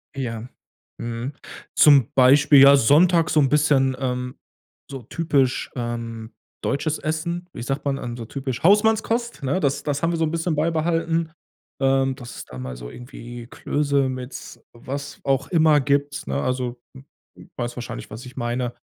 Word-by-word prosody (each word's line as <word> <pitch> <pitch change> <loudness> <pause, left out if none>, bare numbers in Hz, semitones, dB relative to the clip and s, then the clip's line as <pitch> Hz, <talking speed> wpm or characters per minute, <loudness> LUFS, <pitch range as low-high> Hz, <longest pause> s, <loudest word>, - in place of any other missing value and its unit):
Ja. 120 -3 -4 0.5
Mhm. 120 +4 -4 0.4
Zum 140 -6 +6
Beispiel, 140 +2 +6
ja, 140 +1 +9
sonntags 165 +6 +4
so 155 - +4
'n 135 - +3
bisschen, 140 -2 +3
ähm 125 -1 -3 0.5
so 135 -2 -7
typisch, 135 -2 0
ähm, 115 -2 -5 0.3
deutsches 150 +2 -1
Essen, 170 +3 -3
wie - - -7
sagt 135 +3 -3
man, 140 -1 0
ähm, 120 -3 -5
so 115 - -6
typisch 130 0 -5
Hausmannskost, 220 +4 +2
ne? 140 +6 0
Das 140 -5 0
das 145 +1 -2
haben 165 - +2
wir 170 - -1
so 165 - +1
'n 155 - -2
bisschen 165 0 -1
beibehalten, 165 +1 0 0.5
ähm, 135 0 +2
dass 125 -3 -10
es - - -8
da 65 - -11
mal 65 -1 -6
so - - -8
irgendwie 120 -1 -10
Klöße 140 +1 0
mit 130 0 -8
was 140 +4 -7
auch 135 0 0
immer 155 -4 +4
gibt, 140 +1 -1
ne? - - -1
Also, 125 -1 -2 0.2
w 130 - -11 0.4
w - - -13
weißt 120 0 -3
wahrscheinlich, 120 -1 -7
was 115 +5 -8
ich 125 +2 -12
meine. 120 0 -2
135 Hz, 170 wpm, -23 LUFS, 125-155 Hz, 0.5 s, ja